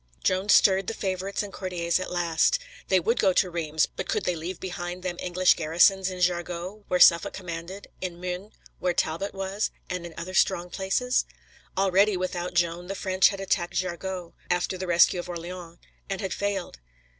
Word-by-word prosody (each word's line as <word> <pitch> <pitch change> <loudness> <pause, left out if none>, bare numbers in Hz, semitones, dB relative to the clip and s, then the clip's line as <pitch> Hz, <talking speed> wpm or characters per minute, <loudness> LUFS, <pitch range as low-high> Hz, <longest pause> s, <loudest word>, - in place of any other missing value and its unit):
Joan 185 +2 +1
stirred 190 -2 +5
the 225 - -2
favorites 195 +1 -2
and 200 - -8
courtiers 175 -2 -1
at 185 - -4
last. 175 - +2 0.3
They 190 - +4
would 230 +7 0
go 190 - +4
to 180 0 +2
Reims, 160 -2 +1
but - - -7
could - - 0
they 180 - +1
leave 170 +3 -5
behind 180 0 -5
them 180 -2 -3
English 180 0 +3
garrisons 175 +4 +3
in 185 -1 -6
Jargeau, 180 +3 -2
where 180 - +1
Suffolk 170 -2 +6
commanded; 180 +2 -7
in 180 -2 -4
Meun, 180 +3 -5 0.3
where 180 -1 0
Talbot 170 +6 -1
was, 195 +2 -2 0.2
and 180 -1 -3
in 170 -2 -9
other 175 +2 -6
strong 175 -1 +2
places? 210 +6 0 0.5
Already, 195 +1 +3
without 180 -1 -3
Joan, 175 0 0
the 195 - -4
French 185 -1 +3
had 195 - -5
attacked 185 -2 -1
Jargeau, 185 -1 -3 0.2
after 180 +1 0
the 185 0 -5
rescue 175 +1 +5
of 175 - -6
Orleans, 175 0 -7 0.3
and 195 -1 -2
had 190 -2 -3
failed. 200 - -3
180 Hz, 180 wpm, -26 LUFS, 175-190 Hz, 0.5 s, Suffolk